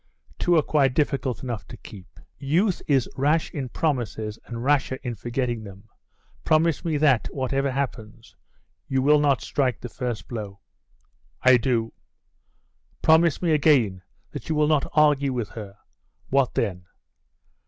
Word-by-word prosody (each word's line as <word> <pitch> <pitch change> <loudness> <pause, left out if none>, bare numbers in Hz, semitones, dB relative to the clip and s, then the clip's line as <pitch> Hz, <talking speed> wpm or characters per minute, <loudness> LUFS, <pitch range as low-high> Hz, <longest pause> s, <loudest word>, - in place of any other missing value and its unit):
'Two 175 - +2
are 155 - +4
quite 135 -4 +2
difficult 140 -4 -1
enough 115 - -5
to - - -10
keep. 95 -3 -14 0.2
Youth 170 +8 +1
is 135 -4 +2
rash 150 +4 +1
in 135 -4 -5
promises, 115 -7 -2
and 115 0 -6
rasher 135 -1 +1
in 120 - -3
forgetting 120 0 -3
them. 100 +1 -12 0.6
Promise 160 0 +2
me 160 -3 0
that, 140 -6 +3
whatever 135 +1 -1
happens, 120 -4 -5 0.5
you 135 -1 0
will 150 +2 +5
not 140 -3 +2
strike 130 -4 -1
the 125 - -7
first 120 -2 -5
blow.' 105 -4 -6 0.8
'I 130 -1 +7
do.' 115 -2 -1 1.1
'Promise 160 +1 +4
me 170 - +2
again, 135 -11 +3 0.3
that - - -8
you 160 - 0
will 150 0 +3
not 150 -2 +1
argue 145 -3 +3
with 120 -5 -3
her.' 105 -3 -9 0.5
'What 135 -1 +1
then? 90 -5 -2
130 Hz, 145 wpm, -24 LUFS, 115-150 Hz, 1.1 s, I